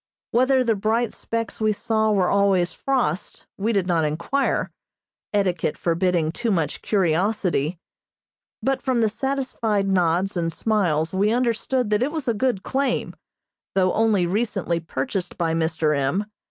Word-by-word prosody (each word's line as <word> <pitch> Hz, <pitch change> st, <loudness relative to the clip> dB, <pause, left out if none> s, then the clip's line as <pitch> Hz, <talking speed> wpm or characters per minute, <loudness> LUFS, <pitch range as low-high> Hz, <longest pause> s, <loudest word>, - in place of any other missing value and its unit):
Whether 255 Hz, +2 st, +3 dB
the 230 Hz, -2 st, +2 dB
bright 220 Hz, +3 st, 0 dB
specks 230 Hz, -1 st, -4 dB
we 215 Hz, 0 st, +3 dB
saw 220 Hz, +1 st, +1 dB
were 190 Hz, -3 st, +2 dB
always 195 Hz, -3 st, +2 dB
frost, 245 Hz, -, -2 dB
we 215 Hz, +4 st, -1 dB
did 200 Hz, -5 st, +1 dB
not 170 Hz, -3 st, +1 dB
enquire, 170 Hz, -, 0 dB, 0.6 s
etiquette 180 Hz, -6 st, 0 dB
forbidding 170 Hz, -2 st, +1 dB
too 230 Hz, +7 st, -2 dB
much 165 Hz, -8 st, 0 dB
curiosity, 180 Hz, -3 st, +1 dB, 0.9 s
but 270 Hz, 0 st, 0 dB
from 255 Hz, -3 st, +1 dB
the 220 Hz, -, +3 dB
satisfied 230 Hz, -4 st, -1 dB
nods 185 Hz, +1 st, +1 dB
and 165 Hz, -1 st, -1 dB
smiles 170 Hz, -6 st, 0 dB
we 200 Hz, +3 st, +2 dB
understood 245 Hz, 0 st, 0 dB
that 210 Hz, +1 st, +2 dB
it 270 Hz, +4 st, +1 dB
was 310 Hz, -4 st, -4 dB
a 235 Hz, -, +3 dB
good 225 Hz, -2 st, 0 dB
claim, 270 Hz, -1 st, -1 dB, 0.6 s
though 185 Hz, -1 st, +3 dB
only 215 Hz, -5 st, +2 dB
recently 195 Hz, -3 st, -1 dB
purchased 165 Hz, +4 st, -3 dB
by 165 Hz, -2 st, 0 dB
Mr. 160 Hz, -2 st, +1 dB
M. 140 Hz, +9 st, 0 dB
200 Hz, 145 wpm, -23 LUFS, 170-230 Hz, 0.9 s, Whether